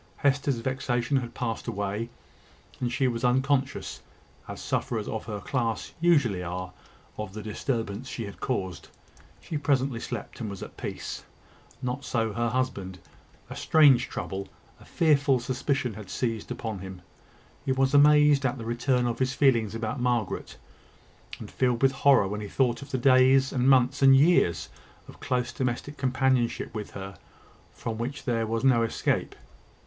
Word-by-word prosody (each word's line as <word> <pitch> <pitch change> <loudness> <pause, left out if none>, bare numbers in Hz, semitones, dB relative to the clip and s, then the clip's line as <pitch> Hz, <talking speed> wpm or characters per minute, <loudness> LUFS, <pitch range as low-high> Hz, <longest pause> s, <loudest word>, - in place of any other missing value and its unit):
Hester's 140 -2 +1
vexation 125 +1 -1
had 120 -3 -4
passed 115 -3 -3
away, 105 +3 -3 0.7
and 120 -1 -1
she 130 +1 +1
was 120 0 -2
unconscious, 130 +2 0 0.5
as - - -7
sufferers 110 -3 -2
of 110 - -4
her 105 -2 -5
class 120 -2 -2
usually 140 - +3
are, 90 +1 -5 0.5
of 105 -2 -5
the 110 - -6
disturbance 110 0 -3
she 115 -3 -4
had 100 - -10
caused. 95 -9 -3 0.5
She 155 - -4
presently 135 -4 +1
slept - - -6
and 110 - -3
was 100 -1 -7
at - - -10
peace. - - -6 0.6
Not 125 +2 -3
so 115 -4 -1
her 115 +1 0
husband. 105 -7 -2 0.5
A - - -8
strange 145 -6 +5
trouble 95 0 -5 0.3
a - - -16
fearful 140 -5 +3
suspicion 130 0 -1
had 100 -2 -10
seized 115 0 -2
upon 110 -4 -4
him. 95 -1 -9 0.6
He 135 - -1
was 135 +1 +2
amazed 150 0 +6
at 130 0 0
the 115 - -7
return 120 +2 +1
of 120 -1 -2
his 130 0 0
feelings 115 -7 +3
about 115 +2 -3
Margaret, 120 -4 -1 0.8
and - - -9
filled 125 -1 0
with 135 - +6
horror 135 -6 +4
when 105 +2 -4
he 105 - -5
thought 120 +2 0
of 140 - -10
the 135 - -1
days, 130 +1 +5
and 130 0 +2
months, 130 +1 +4
and 135 0 +8
years 135 - +3 0.4
of - - -14
close 125 -1 -1
domestic 130 +4 -3
companionship 130 -2 0
with 105 -2 -5
her, 95 0 -8 0.5
from 110 -1 -5
which 135 +4 -4
there 115 -3 0
was 115 +2 -2
no 130 -3 +4
escape. 115 - -1
125 Hz, 160 wpm, -27 LUFS, 110-135 Hz, 0.8 s, and